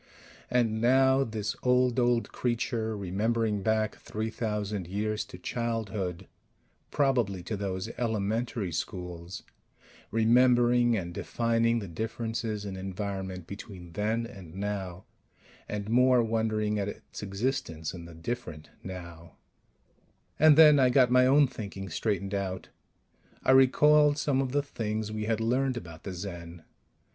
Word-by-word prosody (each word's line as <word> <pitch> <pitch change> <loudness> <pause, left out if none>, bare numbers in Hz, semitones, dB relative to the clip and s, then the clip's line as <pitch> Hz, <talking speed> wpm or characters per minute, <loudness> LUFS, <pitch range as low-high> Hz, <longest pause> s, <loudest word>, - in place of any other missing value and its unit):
And 115 -3 +1
now 130 +2 +4
this 110 -3 -3
old, 125 0 +3
old 120 -1 +1
creature, 115 -2 -1
remembering 105 +2 0
back 110 +1 0
three 110 +1 -4
thousand 105 -5 -3
years 105 +3 -2
to - - -11
childhood 105 -4 -3 0.6
probably 120 -10 +1
to 110 - -3
those 95 -2 -3
"elementary 110 -2 -1
schools" 90 +1 -5 0.7
remembering, 120 +1 +4
and 85 -3 -4
defining 115 +3 +1
the 105 -4 -4
differences 110 +2 -3
in 95 -1 -5
environment 95 -1 -5
between 95 -2 -9
then 110 +6 -1
and 95 -8 -11
now; 95 -2 -4 0.6
and 105 -1 -4
more, 125 +1 +4
wondering 110 -2 0
at 100 - -1
its 105 - -8
existence 100 - -3
in 85 -2 -8
the 85 -1 -11
different 80 -4 -6
now 85 -3 -9 1.0
And 155 -1 +7
then 150 -3 +8
I 130 -1 +5
got 125 -1 +4
my 125 0 +5
own 145 +2 +6
thinking 100 -6 -7
straightened 100 +2 -2
out. 95 -2 -3 0.7
I - - +4
recalled 150 +3 +5
some 140 -2 +1
of 130 -2 -2
the 145 +1 +1
things 110 -5 -3
we 110 0 -3
had 110 0 0
learned 125 +3 +1
about 85 -7 -9
the 95 - -4
Zen. 85 -2 -7
110 Hz, 135 wpm, -29 LUFS, 95-120 Hz, 1.0 s, then